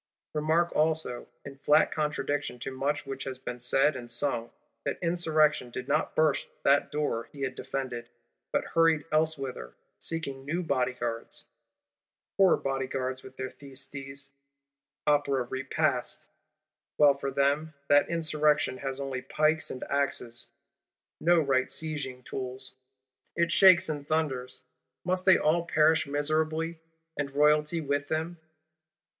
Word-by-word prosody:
Remark 160 Hz, +3 st, +1 dB
also, 155 Hz, -5 st, 0 dB, 0.2 s
in 140 Hz, -1 st, -9 dB
flat 150 Hz, +2 st, +4 dB
contradiction 145 Hz, -3 st, -2 dB
to 125 Hz, -, -5 dB
much 145 Hz, +3 st, -2 dB
which 135 Hz, -1 st, -5 dB
has 130 Hz, -1 st, -4 dB
been 125 Hz, -1 st, -6 dB
said 135 Hz, +4 st, +3 dB
and 120 Hz, -2 st, -7 dB
sung, 120 Hz, -1 st, 0 dB, 0.3 s
that -, -, -2 dB
Insurrection 160 Hz, -6 st, +2 dB
did 125 Hz, +1 st, -6 dB
not 150 Hz, +2 st, 0 dB
burst 155 Hz, -2 st, +2 dB, 0.2 s
that 140 Hz, +1 st, +3 dB
door 145 Hz, -6 st, -2 dB
he 140 Hz, -, -10 dB
had 130 Hz, -1 st, -1 dB
defended; 125 Hz, -3 st, -5 dB, 0.4 s
but -, -, 0 dB
hurried 165 Hz, -2 st, +4 dB
elsewhither, 140 Hz, -, -1 dB, 0.2 s
seeking 140 Hz, -5 st, -3 dB
new 170 Hz, +6 st, -2 dB
bodyguards. 125 Hz, -5 st, -2 dB, 0.9 s
Poor 190 Hz, -2 st, +5 dB
Bodyguards, 130 Hz, -1 st, -2 dB
with 130 Hz, 0 st, -13 dB
their 130 Hz, 0 st, -4 dB
Thyestes' 135 Hz, 0 st, -9 dB, 0.7 s
Opera 145 Hz, -3 st, +2 dB
Repast! 130 Hz, +2 st, -1 dB, 0.7 s
Well 145 Hz, -2 st, +7 dB
for 140 Hz, 0 st, -4 dB
them, 140 Hz, +3 st, +1 dB
that 145 Hz, 0 st, +5 dB
Insurrection 150 Hz, -4 st, +1 dB
has 135 Hz, -1 st, -3 dB
only 135 Hz, -2 st, -3 dB
pikes 155 Hz, +4 st, +1 dB
and 130 Hz, -, -6 dB
axes; 125 Hz, -4 st, -2 dB, 0.7 s
no 170 Hz, +1 st, +4 dB
right 135 Hz, -4 st, +2 dB
sieging 145 Hz, -5 st, -4 dB
tools! 130 Hz, 0 st, -5 dB, 0.6 s
It 170 Hz, 0 st, +1 dB
shakes 185 Hz, +1 st, +7 dB
and 145 Hz, -2 st, -4 dB
thunders. 135 Hz, -6 st, -2 dB, 0.4 s
Must 185 Hz, +1 st, 0 dB
they 190 Hz, -1 st, +7 dB
all 165 Hz, +3 st, +2 dB
perish 160 Hz, -2 st, +3 dB
miserably, 155 Hz, +3 st, 0 dB, 0.4 s
and 145 Hz, -1 st, -1 dB
Royalty 150 Hz, +3 st, +3 dB
with 145 Hz, -1 st, -1 dB
them? 160 Hz, +2 st, -2 dB
145 Hz, 130 wpm, -29 LUFS, 130-155 Hz, 0.9 s, Well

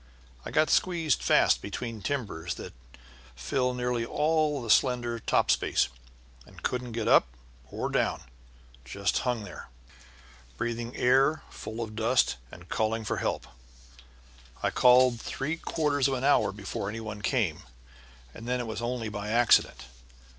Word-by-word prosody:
I -, -, -6 dB
got 155 Hz, 0 st, +2 dB
squeezed 165 Hz, -7 st, +2 dB
fast -, -, +4 dB
between 110 Hz, +2 st, -5 dB
timbers 95 Hz, -, -3 dB
that -, -, -9 dB, 0.6 s
fill 125 Hz, -, -1 dB
nearly 125 Hz, -1 st, -1 dB
all 150 Hz, +3 st, +1 dB
the 115 Hz, -, -7 dB
slender 120 Hz, -2 st, +2 dB
top -, -, +2 dB
space, -, -, +1 dB, 0.5 s
and -, -, -16 dB
couldn't 125 Hz, -2 st, -2 dB
get 115 Hz, -1 st, -2 dB
up -, -, +6 dB, 0.4 s
or -, -, -3 dB
down, -, -, 0 dB, 0.5 s
but 65 Hz, +1 st, -24 dB
just 95 Hz, +9 st, -1 dB
hung 125 Hz, -4 st, -1 dB
there, 100 Hz, -, -10 dB, 0.9 s
breathing 120 Hz, +1 st, -3 dB
air 135 Hz, +5 st, +3 dB
full 110 Hz, +2 st, -7 dB
of 110 Hz, -2 st, -6 dB
dust 115 Hz, -, +2 dB
and 90 Hz, +1 st, -13 dB
calling 110 Hz, +4 st, -1 dB
for -, -, -2 dB
help. -, -, -2 dB, 1.2 s
I -, -, +1 dB
called 125 Hz, -1 st, +5 dB
three 155 Hz, +5 st, -3 dB
quarters 145 Hz, -5 st, 0 dB
of 135 Hz, -, 0 dB
an 130 Hz, -, -4 dB
hour 140 Hz, -7 st, +3 dB
before 100 Hz, 0 st, -5 dB
any 110 Hz, +2 st, -5 dB
one 105 Hz, -2 st, -7 dB
came, 100 Hz, -, 0 dB, 0.7 s
and 115 Hz, -, -10 dB
then 125 Hz, 0 st, 0 dB
it 120 Hz, -, -3 dB
was 110 Hz, 0 st, -5 dB
only 120 Hz, -1 st, -2 dB
by 105 Hz, 0 st, -5 dB
accident. 115 Hz, -, +3 dB
120 Hz, 150 wpm, -28 LUFS, 110-130 Hz, 1.2 s, up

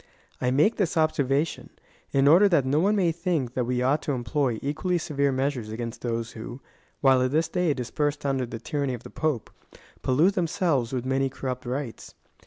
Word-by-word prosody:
I 125 Hz, -, +2 dB
make 150 Hz, -, +3 dB
this 185 Hz, -4 st, 0 dB
observation, 150 Hz, -1 st, +1 dB, 0.4 s
in 135 Hz, 0 st, +3 dB
order 180 Hz, +7 st, +7 dB
that 160 Hz, -7 st, +3 dB
no 140 Hz, +3 st, +2 dB
one 200 Hz, +5 st, +3 dB
may 180 Hz, -5 st, +2 dB
think 165 Hz, -7 st, -1 dB
that 125 Hz, -2 st, 0 dB
we 125 Hz, 0 st, 0 dB
ought 145 Hz, +4 st, +2 dB
to 145 Hz, -, -2 dB
employ 125 Hz, 0 st, 0 dB
equally 155 Hz, +6 st, 0 dB
severe 140 Hz, -4 st, 0 dB
measures 130 Hz, -4 st, -1 dB
against 115 Hz, +1 st, -5 dB
those 115 Hz, -1 st, -2 dB
who, 120 Hz, +3 st, -8 dB, 0.4 s
while 135 Hz, -2 st, +5 dB
at 130 Hz, -, +2 dB
this 160 Hz, +4 st, +1 dB
day 180 Hz, -2 st, +1 dB
dis 125 Hz, -2 st, -5 dB
persed 145 Hz, -1 st, -1 dB
under 135 Hz, -3 st, 0 dB
the 115 Hz, -, -6 dB
tyranny 140 Hz, +2 st, -2 dB
of 120 Hz, -, -11 dB
the -, -, -11 dB
Pope, 150 Hz, -8 st, -2 dB, 0.5 s
pollute 155 Hz, +10 st, +3 dB
themselves 170 Hz, -, 0 dB
with 125 Hz, -2 st, -2 dB
many 135 Hz, +1 st, +1 dB
corruj)t 130 Hz, -1 st, -5 dB
rites. 130 Hz, -2 st, -5 dB
140 Hz, 190 wpm, -26 LUFS, 125-155 Hz, 0.5 s, order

